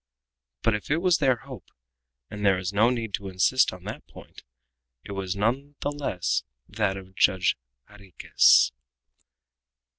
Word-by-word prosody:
But 115 - +2
if 105 - -4
it 150 - +2
was 175 -1 +2
their 135 -4 +3
hope 135 +1 -12 0.6
and 105 0 -6
there 100 -2 +4
is 90 +1 -4
no 110 +4 +4
need 115 -4 -3
to 100 - -3
insist 95 +8 +2
on 90 -1 -12
that 105 +3 -8
point - - -14 0.6
it - - -10
was 95 -1 -3
none 130 +8 -1
the 145 - -1
less 90 - -2 0.3
that 105 -2 -1
of 95 -1 -12
Judge 95 -1 +2 0.3
Jarriquez. 100 -9 +3
105 Hz, 150 wpm, -25 LUFS, 95-130 Hz, 0.6 s, there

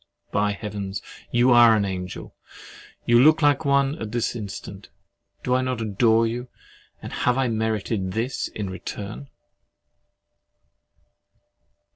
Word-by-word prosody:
By 105 0 +1
Heaven, 100 -2 -6 0.3
you 120 +2 +3
are 120 -2 +7
an 105 -2 +1
angel! 90 -1 -6 0.7
You 120 0 +5
look 155 +4 +5
like 145 +1 +3
one 140 +2 +2
at 110 -1 -5
this 120 +1 -1
instant! 105 -4 -8 0.5
Do 125 - 0
I 130 - +3
not 130 -2 -2
adore 110 +1 +2
you—and 120 +2 -9
have 125 +1 +1
I 135 -1 +2
merited 110 -3 -1
this 115 +5 -2
return? 100 +5 -6
115 Hz, 115 wpm, -24 LUFS, 105-125 Hz, 0.7 s, are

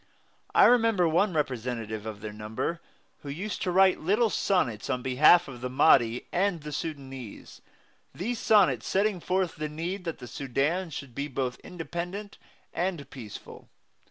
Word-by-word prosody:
I - - +8
remember 225 -7 +4
one 180 +5 +2
representative 120 -7 -3
of 105 -2 -7
their 105 -1 -6
number, 110 +11 -4 0.4
who 145 - -9
used 185 +9 -4
to - - 0
write 190 +1 +5
little 210 +7 +2
sonnets 125 - 0
on 125 -1 -1
behalf 150 +7 +5
of 125 -3 -9
the 125 - -3
Mahdi 125 -3 +4
and 180 -2 0
the 150 +1 -7
Sudanese, 135 -7 -7 0.5
these 230 +7 -3
sonnets 180 - +3
setting 200 -1 +1
forth 180 0 -1
the 155 0 -3
need 175 +5 -4
that 165 - -3
the 125 - -9
Sudan 140 +9 -1
should 140 -4 -7
be 140 +4 -3
both 130 -2 -3
independent 180 +4 -6 0.3
and 175 -5 -2
peaceful. 115 -6 -10
155 Hz, 155 wpm, -28 LUFS, 125-185 Hz, 0.5 s, I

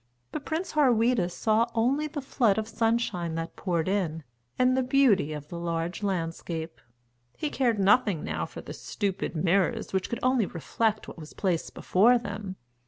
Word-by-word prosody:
But 290 - -5
Prince 330 +3 -2
Harweda 245 - +3
saw 220 +5 +1
only 265 +7 +2
the 290 -2 -6
flood 235 -6 +2
of 220 0 -1
sunshine 225 -7 0
that 165 0 -4
poured 170 -4 -1
in, 175 -5 -1 0.3
and 255 0 +4
the 260 - +2
beauty 250 - +3
of 150 -1 -7
the 170 - -6
large 170 +2 -2
landscape. 165 -3 -3 0.6
He 300 - -2
cared 240 -5 +1
nothing 200 -3 +3
now 80 0 -2
for - - -9
the - - -8
stupid 195 -3 -3
mirrors 190 +7 +1
which 190 -1 0
could 235 - -2
only 255 -5 +3
reflect 215 +6 -1
what - - -9
was 155 -1 -10
placed 180 -5 -1
before 230 +7 +4
them. 205 -4 -6
205 Hz, 170 wpm, -27 LUFS, 170-240 Hz, 0.6 s, and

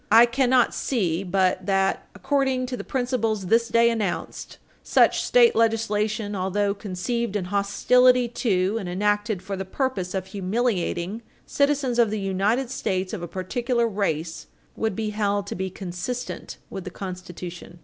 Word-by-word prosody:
I 230 +2 +9
cannot 250 0 +2
see 185 -9 -1
but 185 0 +1
that, 195 -1 +1
according 265 +4 0
to 250 0 -4
the - - -6
principles 235 -6 -1
this 230 +5 +3
day 235 0 +4
announced, 215 -5 -3 0.2
such - - +3
state 480 -2 +5
legislation, 215 -2 0
although 200 +2 0
conceived 210 +3 -3
in 195 -3 -1
hostility 245 +6 +3
to, 205 -4 0
and 190 -4 -5
enacted 205 +1 0
for 195 +1 -4
the 190 - -4
purpose 195 -3 -2
of 190 -1 -2
humiliating, 195 -1 -1 0.2
citizens 280 -4 +1
of 230 -2 +5
the 215 0 -2
United 200 +7 0
States 185 -7 -2
of 205 - -4
a 175 - -4
particular 235 +7 -1
race, 170 -6 -2 0.3
would 220 -3 -1
be 215 0 -2
held 205 -1 0
to - - -5
be 190 +1 -3
consistent 190 +7 -5
with 190 - -5
the 185 - -6
Constitution. 180 -2 -8
205 Hz, 150 wpm, -24 LUFS, 185-235 Hz, 0.3 s, I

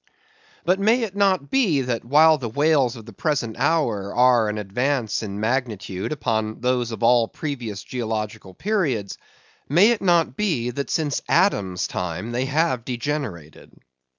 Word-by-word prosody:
But 180 +3 +2
may 225 +5 +3
it 200 -4 -4
not 190 -7 +1
be, 200 - +2
that 125 -3 -2
while 155 +5 +5
the 120 -3 -4
whales 140 -1 +2
of 115 -3 -11
the 115 - -12
present 125 - -2
hour 105 -12 0
are 120 -3 +4
an 105 - -3
advance 120 +4 -1
in 100 -2 -5
magnitude 110 -5 -2
upon 110 -7 -2
those 125 -1 0
of 115 - -6
all 115 -1 +4
previous 120 -10 -5
geological 110 -5 -5
periods; 150 - -1 0.5
may 180 - +5
it 235 - -1
not 170 -7 +2
be, 135 - -1
that 140 +3 -4
since 150 -3 -1
Adam's 95 - +2
time 90 +5 -4
they 125 +2 -1
have 140 -3 0
degenerated? 120 - -5
125 Hz, 150 wpm, -23 LUFS, 110-155 Hz, 0.5 s, while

